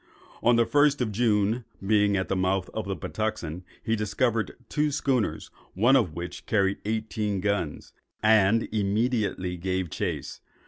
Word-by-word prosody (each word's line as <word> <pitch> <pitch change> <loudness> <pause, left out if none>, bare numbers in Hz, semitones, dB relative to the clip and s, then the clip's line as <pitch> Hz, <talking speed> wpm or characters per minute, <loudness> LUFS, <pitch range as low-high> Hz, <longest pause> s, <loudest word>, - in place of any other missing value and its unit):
On 120 0 +4
the 115 0 +4
1st 145 +1 +3
of 115 -3 0
June, 110 +1 +1 0.2
being 105 -1 +3
at 95 - -1
the - - -1
mouth 95 0 0
of 110 - -3
the 100 - -2
Patuxent, 90 -2 -4 0.2
he 110 - +1
discovered 110 +1 0
two 150 0 +1
schooners, 125 - -1 0.2
one 120 +8 +5
of 105 - +2
which 85 +1 -7
carried 100 -2 +1
eighteen 110 -2 -1
guns; 100 -6 -2 0.3
and 110 0 +4
immediately 105 -3 0
gave 95 -1 -2
chase. - - -4
105 Hz, 145 wpm, -27 LUFS, 95-115 Hz, 0.3 s, one